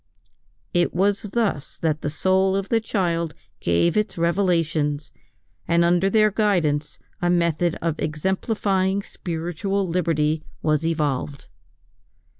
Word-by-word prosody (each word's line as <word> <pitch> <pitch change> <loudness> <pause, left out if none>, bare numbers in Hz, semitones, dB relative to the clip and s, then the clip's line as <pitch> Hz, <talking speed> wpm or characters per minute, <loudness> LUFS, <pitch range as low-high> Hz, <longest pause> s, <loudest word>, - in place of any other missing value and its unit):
It 175 -1 +1
was 200 +2 +2
thus 200 -11 -1
that 155 -2 -1
the 145 - -2
soul 190 +5 +2
of 195 0 -2
the 230 - +3
child 170 -7 -1 0.2
gave 85 - +2
its 215 -3 0
revelations, 165 -4 0 0.6
and 170 0 +3
under 175 +3 +3
their 215 +1 +4
guidance 170 -9 +1 0.2
a 175 - +2
method 170 -1 +1 0.2
exemplifying 190 +4 0
spiritual 175 +4 -3
liberty 160 -3 0 0.2
was 155 0 +2
evolved. 145 -3 -2
170 Hz, 110 wpm, -23 LUFS, 155-195 Hz, 0.6 s, their